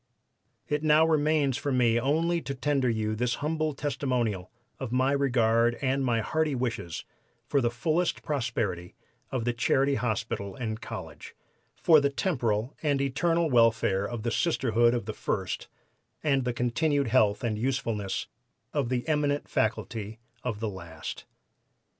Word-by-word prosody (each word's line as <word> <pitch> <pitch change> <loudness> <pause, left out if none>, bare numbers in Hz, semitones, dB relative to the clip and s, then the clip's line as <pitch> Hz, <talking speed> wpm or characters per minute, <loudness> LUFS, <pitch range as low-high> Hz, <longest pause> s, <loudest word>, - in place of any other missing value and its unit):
"It 150 0 0
now 155 +1 +5
remains 150 -4 +2
for 145 -1 -2
me 120 -2 +3
only 165 +6 +1
to 140 - -5
tender 135 -1 +1
you 110 -1 -1
this 120 +2 0
humble 155 0 -1
testimonial 125 -9 -1 0.3
of 130 -4 -4
my 130 +2 +2
regard 120 -4 +3
and 135 0 0
my 120 -3 +1
hearty 155 +3 0
wishes 115 -9 -3 0.4
for 140 - +1
the 120 - +2
fullest 155 +9 0
prosperity 115 - -2 0.3
of 125 -4 -2
the 120 - +1
Charity 135 +3 +2
Hospital 110 -5 -2
and 110 -3 -4
College, - - -8 0.4
for 155 -3 +5
the 140 - +2
temporal 125 - -1
and 145 -3 +1
eternal 165 +4 +1
welfare 115 -5 +3
of 120 -2 -5
the 120 - -1
Sisterhood 120 -7 +2
of 120 - -3
the 110 - -4
first, - - -3 0.6
and 135 -4 +2
the 125 - +1
continued 140 +3 +1
health 110 -2 +3
and 110 -3 -1
usefulness 115 -6 -1 0.5
of 140 -5 0
the 125 +1 -1
eminent 145 -2 +1
faculty 110 0 -2 0.3
of 115 -5 -3
the 110 -1 -2
last." 85 -4 -8
125 Hz, 145 wpm, -28 LUFS, 115-145 Hz, 0.6 s, now